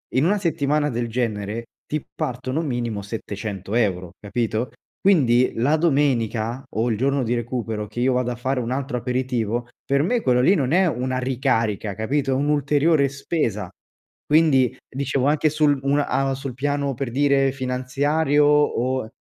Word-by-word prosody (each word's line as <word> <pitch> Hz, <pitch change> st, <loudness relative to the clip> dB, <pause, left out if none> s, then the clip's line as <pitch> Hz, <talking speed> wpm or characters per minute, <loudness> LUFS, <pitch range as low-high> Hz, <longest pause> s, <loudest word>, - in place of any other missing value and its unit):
In 130 Hz, -, +3 dB
una 205 Hz, +3 st, +2 dB
settimana 150 Hz, -4 st, +1 dB
del 120 Hz, 0 st, -2 dB
genere 110 Hz, -1 st, -2 dB, 0.2 s
ti 150 Hz, -1 st, -3 dB
partono 130 Hz, +4 st, -2 dB
minimo 120 Hz, -7 st, -2 dB
700 100 Hz, -1 st, -5 dB
euro, 95 Hz, -7 st, 0 dB
capito, 110 Hz, +2 st, -2 dB, 0.3 s
quindi 130 Hz, -11 st, +3 dB
la 145 Hz, +7 st, +3 dB
domenica 130 Hz, -6 st, +1 dB
o 115 Hz, +3 st, -1 dB
il 110 Hz, -, 0 dB
giorno 135 Hz, +3 st, +1 dB
di 120 Hz, 0 st, 0 dB
recupero 115 Hz, -3 st, -3 dB
che 120 Hz, -, -8 dB
io 130 Hz, +1 st, +2 dB
vado 125 Hz, -1 st, 0 dB
a -, -, -4 dB
fare 130 Hz, +2 st, -1 dB
un 120 Hz, 0 st, -3 dB
altro 135 Hz, -1 st, -2 dB
aperitivo, 120 Hz, -2 st, -1 dB, 0.2 s
per 140 Hz, +1 st, +2 dB
me 230 Hz, +8 st, +1 dB
quello 125 Hz, -1 st, +3 dB
lì 185 Hz, +10 st, +5 dB
non 140 Hz, -5 st, 0 dB
è 185 Hz, +1 st, +4 dB
una 130 Hz, -2 st, -1 dB
ricarica, 115 Hz, -5 st, 0 dB
capito, 135 Hz, +6 st, -1 dB
è -, -, +3 dB
un'ulteriore 145 Hz, +1 st, +2 dB
spesa. 135 Hz, -, -2 dB, 0.6 s
Quindi 150 Hz, -5 st, +4 dB
dicevo 135 Hz, 0 st, -1 dB
anche 150 Hz, +1 st, +3 dB
sul 150 Hz, -2 st, +2 dB
un 140 Hz, +1 st, +2 dB
a 135 Hz, 0 st, 0 dB
sul 135 Hz, -1 st, -6 dB
piano 140 Hz, +1 st, -1 dB
per 130 Hz, 0 st, -4 dB
dire 135 Hz, 0 st, +3 dB
finanziario 140 Hz, +3 st, +1 dB
o 130 Hz, -5 st, +2 dB
130 Hz, 160 wpm, -22 LUFS, 120-145 Hz, 0.6 s, lì